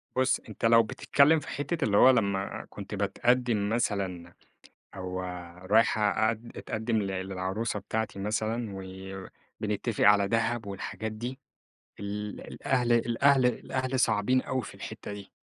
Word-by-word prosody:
بُص، 130 0 +2
أنتَ 110 - -4
لو 115 0 +7
بتتكلم 145 +7 +3
في - - -11
حتة 145 +3 -2
اللي 100 -2 +2
هو 130 - +8
لما 100 -6 +1
كنت - - -7
باتقدم 120 -4 +1
مثلًا 95 -6 -2 0.6
أو 95 -1 -4 0.5
رايح 110 0 +4
أقد 110 +2 +1
أتقدم 110 +1 -2
للعروسة 95 +3 -2
بتاعتي 110 0 -3
مثلًا، 110 +2 -1 0.9
وبنتفق 105 +2 -1
على 100 -1 +6
دهب 115 0 0
والحاجات 100 +2 -5
دي، 120 +5 -5 0.6
ال 105 +1 -4
الأهل 125 -3 0
الأهل 125 +3 +4
الأهل 130 +2 -1
صعبين 125 +4 +2
أوي 130 -1 -2
في - - -9
الحتة - - -7
دي. 100 -1 -9
110 Hz, 130 wpm, -29 LUFS, 100-120 Hz, 0.9 s, هو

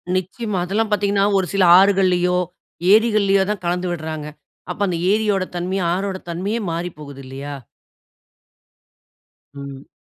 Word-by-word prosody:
நிச்சயமா, 190 +3 -3
அதெல்லாம் 210 +4 -1
பார்த்தீங்கனா, 200 -1 +1
ஒரு 190 - +1
சில 195 -1 +3 0.2
ஆறுகள்லயோ, 185 -2 +3 0.5
ஏரிகள்லயோ 210 -3 +4
தான் 200 -4 -5
கலந்து 180 +1 -1
விடுறாங்க, 155 -2 -5 0.4
அப்போ 190 - -7
அந்த 175 -2 -1
ஏரியோட 210 -3 +1
தன்மை, 180 +2 -2 0.2
ஆறோட 190 +1 -2
தன்மையே 195 +7 -2
மாறிப்போகுது 150 -5 -6
இல்லையா? 140 +2 -7 2.0
ம். 140 -1 -9
185 Hz, 115 wpm, -20 LUFS, 170-200 Hz, 2.0 s, ஏரிகள்லயோ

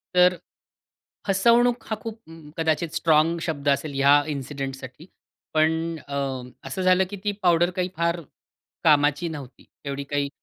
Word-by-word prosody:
तर 180 0 +5 0.9
फसवणूक 235 +5 +3
हा 220 - 0
खूप 225 -1 -6 0.4
कदाचित 160 0 0
स्ट्राँग 160 +1 +3
शब्द 150 -4 -3
असेल 140 +1 0
ह्या 140 +1 +5 0.2
इन्सिडेंटसाठी. 135 0 -6 0.5
पण 155 0 +4 0.4
अ, 140 0 -4 0.5
असं 190 - -4
झालं 185 0 +4
की 205 - -6
ती 205 - +1
पावडर 175 -1 +4
काही 180 0 0
फार 170 +1 +1 0.6
कामाची 150 +2 +3
नव्हती 140 -5 -9 0.2
एवढी 140 0 -3
काही. 140 0 -2
160 Hz, 130 wpm, -24 LUFS, 140-180 Hz, 0.9 s, तर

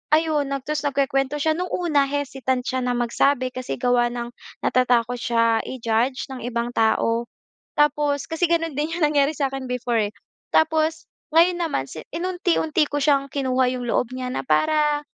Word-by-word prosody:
ayon 310 -3 +1
nag 275 -1 -3
ta's 300 +1 -2
nagkukuwento 275 0 0
siya. 315 +2 +2
No'ng 360 +1 -2
una, 305 -6 +1
hesitant 270 -2 -2
siya 260 +1 -2
na 245 0 0
magsabi 255 +2 +1
kasi 255 -1 -4
gawa 245 -1 +2
ng 240 0 -5 0.3
natatakot 245 -1 +2
siya 230 -1 +2
i-judge 245 +1 -1
ng 260 - -7
ibang 240 0 -2
tao. 230 +1 +1 0.5
Tapos 295 -1 +2
kasi 325 +2 0
gano'n 330 -2 +1
din 300 +3 -1
'yong 340 -1 0
nangyari 290 -1 +2
sa'kin 270 -1 -2
before 245 -2 0
eh. - - -33 0.4
Tapos 315 0 +2 0.3
ngayon 345 +2 +4
naman, 275 - -1
si-inunti-unti 330 - -1
ko 290 - -1
siyang 275 -1 +2
kinuha 260 -2 +1
'yong 250 -1 -4
loob 235 +1 0
niya 255 0 -4
na - - -2
para 300 +1 +2
275 Hz, 160 wpm, -23 LUFS, 245-300 Hz, 0.5 s, ngayon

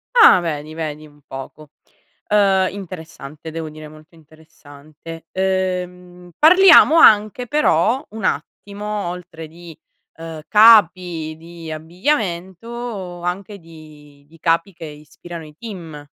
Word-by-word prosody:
Ah 455 - +8
vedi, 155 -2 -5
vedi 155 -1 -6
un 145 -1 -20
poco, 140 +3 -10 0.6
uhm, 195 -2 +3
interessante, 160 -5 -10
devo 160 0 -6
dire 155 0 -11
molto 155 +2 -17
interessante; 155 0 -14
ehm, 180 -1 -3
parliamo 335 -1 +7
anche 215 -1 +4
però 260 - +1
un 220 -1 -8
attimo 205 +5 -4
oltre 175 -2 -9
di, 165 0 -14 0.4
uhm, 165 -1 -8
capi 180 -7 +4
di 165 0 -11
abbigliamento, 185 - -4
anche 190 +3 -5
di 155 -3 -17
di 165 +2 -20
capi 165 +4 0
che 165 -1 -10
ispirano 155 +2 -11
i 150 -1 -15
team, 170 -9 -9
170 Hz, 115 wpm, -19 LUFS, 155-195 Hz, 0.6 s, Ah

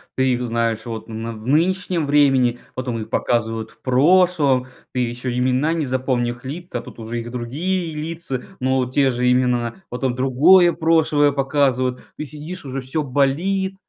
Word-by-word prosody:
ты 130 0 +2
их 125 - -2
знаешь 115 -1 -1
вот 115 -2 -6
на 115 0 -5
в 110 0 -10
нынешнем 170 +3 +1
времени 135 -4 +3 0.2
потом 125 -2 -3
их 110 - -8
показывают 115 -2 -1
в - - -26
прошлом. 145 -1 +3 0.3
Ты 125 - -1
еще 125 0 -2
имена 130 +5 +1
не 165 -3 -1
запомни 130 -2 -1
лица 145 -1 -5
тут - - -13
уже 115 +1 -4
их 120 +1 -8
другие 160 +8 -2
лица, 155 -4 -4 0.2
но 130 0 +1
те 135 +1 +3
же 125 0 +1
имена. 125 -2 +1
Потом 125 +1 -2
другое 155 +8 +5
прошлое 160 -3 +3
показывают. 135 -2 0 0.2
Ты 150 - -4
сидишь 155 +4 -8
уже 135 0 -4
всё 130 +5 -2
болит. 165 +9 0
130 Hz, 160 wpm, -21 LUFS, 125-155 Hz, 0.3 s, другое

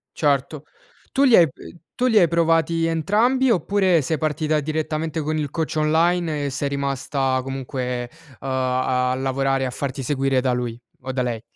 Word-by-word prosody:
Certo, 145 0 0 0.5
tu 275 - +2
li 255 -4 +6
hai 170 - +7
p - - -46
ehm, 170 - -12 0.2
tu 250 - 0
li 225 -4 +5
hai 175 - +5
provati 165 0 +2
entrambi, 215 - +2
oppure 190 -4 +2
sei 155 +4 -1
partita 155 0 0
direttamente 155 +1 -2
con 155 +1 -2
il 150 -2 -2
coach 160 +2 -3
online 160 0 +1
e - - -1
sei 140 +1 -2
rimasta 135 -1 -1
comunque, 125 -2 -4 0.3
uhm, 135 - -8
a 130 -1 0
a - - 0
lavorare 135 0 0
e - - 0
a 125 - -3
farti 135 +1 -4
seguire 135 0 +1
da 130 0 0
lui 120 -1 -3 0.2
o 130 +1 -5
da 130 0 -1
lei? 115 -3 -3
145 Hz, 185 wpm, -22 LUFS, 130-165 Hz, 0.5 s, hai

